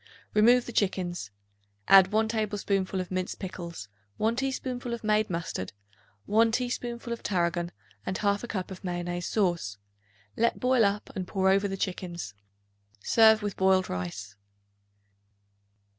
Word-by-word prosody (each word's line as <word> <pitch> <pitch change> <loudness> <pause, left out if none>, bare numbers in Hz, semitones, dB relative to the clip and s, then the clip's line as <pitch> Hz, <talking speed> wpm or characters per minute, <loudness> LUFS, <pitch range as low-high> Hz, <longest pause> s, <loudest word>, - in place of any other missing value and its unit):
Remove 235 +4 +5
the - - -6
chickens; 185 - -1 0.6
add 190 0 +8
1 220 +1 +2
tablespoonful 205 -3 -1
of 185 -1 -5
minced 185 0 -2
pickles, 170 - -7 0.3
1 225 +2 +1
teaspoonful 255 -2 -2
of 235 - -12
made 215 0 +2
mustard, 165 - -4 0.5
1 225 +2 +4
teaspoonful 240 -1 -2
of 235 - -7
tarragon 175 -2 0 0.3
and 190 - -3
1/2 205 +3 0
cup 190 -2 -3
of 190 - -9
mayonnaise 175 -1 -3
sauce. 175 - 0 0.6
Let 235 +1 +1
boil 250 -3 +4
up 200 +1 -1
and 185 -2 -3
pour 190 -1 +1
over 195 +1 +3
the 195 0 -4
chickens. 175 - -4 0.7
Serve 220 -1 +5
with 205 -2 -2
boiled 190 0 +3
rice. 100 +3 -5
195 Hz, 135 wpm, -28 LUFS, 175-220 Hz, 0.7 s, add